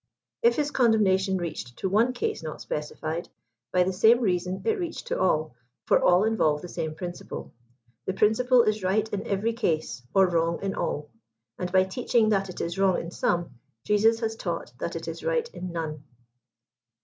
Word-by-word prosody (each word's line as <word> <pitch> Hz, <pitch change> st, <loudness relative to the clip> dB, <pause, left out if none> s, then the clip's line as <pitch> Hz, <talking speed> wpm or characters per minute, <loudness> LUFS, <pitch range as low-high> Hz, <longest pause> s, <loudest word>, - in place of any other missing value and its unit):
If 470 Hz, 0 st, +4 dB
his 295 Hz, -1 st, 0 dB
condemnation 200 Hz, -7 st, +3 dB
reached 160 Hz, -8 st, -5 dB
to -, -, -1 dB
one 220 Hz, +6 st, +3 dB
case 245 Hz, -, -2 dB
not 155 Hz, -1 st, -6 dB
specified, 155 Hz, +2 st, -4 dB, 0.4 s
by 180 Hz, 0 st, +4 dB
the 190 Hz, +1 st, -1 dB
same 220 Hz, +6 st, +5 dB
reason 185 Hz, -4 st, -1 dB
it 445 Hz, -2 st, +1 dB
reached 345 Hz, +3 st, -4 dB
to -, -, -1 dB
all, 155 Hz, -3 st, +1 dB, 0.3 s
for -, -, +4 dB
all 180 Hz, +2 st, +5 dB
involve 160 Hz, -10 st, +1 dB
the -, -, -5 dB
sam^ 155 Hz, -2 st, -4 dB
principle. 175 Hz, 0 st, -7 dB, 0.5 s
The 190 Hz, -, 0 dB
principle 240 Hz, +4 st, +4 dB
is 215 Hz, -1 st, 0 dB
right 200 Hz, +4 st, +1 dB
in 200 Hz, -, -3 dB
every 205 Hz, +4 st, 0 dB
case, 160 Hz, -, -1 dB
or 195 Hz, -1 st, +7 dB
wrong 170 Hz, -1 st, +1 dB
in 195 Hz, -1 st, -1 dB
all; 150 Hz, 0 st, -3 dB, 0.5 s
and 180 Hz, -1 st, -3 dB
by 185 Hz, 0 st, +5 dB
teaching 225 Hz, +3 st, +1 dB
that 195 Hz, -2 st, +1 dB
it 180 Hz, -, -6 dB
is 170 Hz, +3 st, -3 dB
wrong 190 Hz, -2 st, +3 dB
in 170 Hz, -, -6 dB
some, 170 Hz, -9 st, -1 dB, 0.2 s
Jesus 225 Hz, +2 st, +3 dB
has 225 Hz, -1 st, -1 dB
taught -, -, -4 dB
that -, -, -3 dB
it -, -, -5 dB
is -, -, -6 dB
right 485 Hz, -1 st, 0 dB
in 180 Hz, -1 st, -6 dB
none. 155 Hz, -3 st, -4 dB
190 Hz, 185 wpm, -26 LUFS, 170-225 Hz, 0.5 s, or